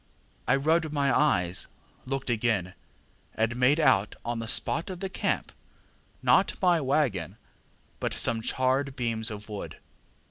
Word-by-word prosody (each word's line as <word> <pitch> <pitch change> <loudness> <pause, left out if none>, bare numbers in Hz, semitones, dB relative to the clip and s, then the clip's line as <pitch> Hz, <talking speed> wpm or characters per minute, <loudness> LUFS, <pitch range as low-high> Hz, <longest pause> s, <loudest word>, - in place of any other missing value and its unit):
I - - +4
rubbed 160 +3 +1
my 140 -2 +1
eyes, 95 -12 +2 0.4
looked 135 -1 -2
again, 110 -6 0 0.6
and 110 +2 0
made 130 +5 +3
out 105 -10 +3
on 120 0 -2
the 115 - -5
spot 160 +9 0
of 185 -2 -6
the 195 - -4
camp, - - -2 0.7
not - - +3
my 175 -3 +3
waggon, 130 - 0 0.6
but - - -2
some 115 -1 +2
charred 130 +3 0
beams 115 -3 -1
of 105 -1 -8
wood. 105 -2 -7
125 Hz, 140 wpm, -28 LUFS, 110-150 Hz, 0.7 s, I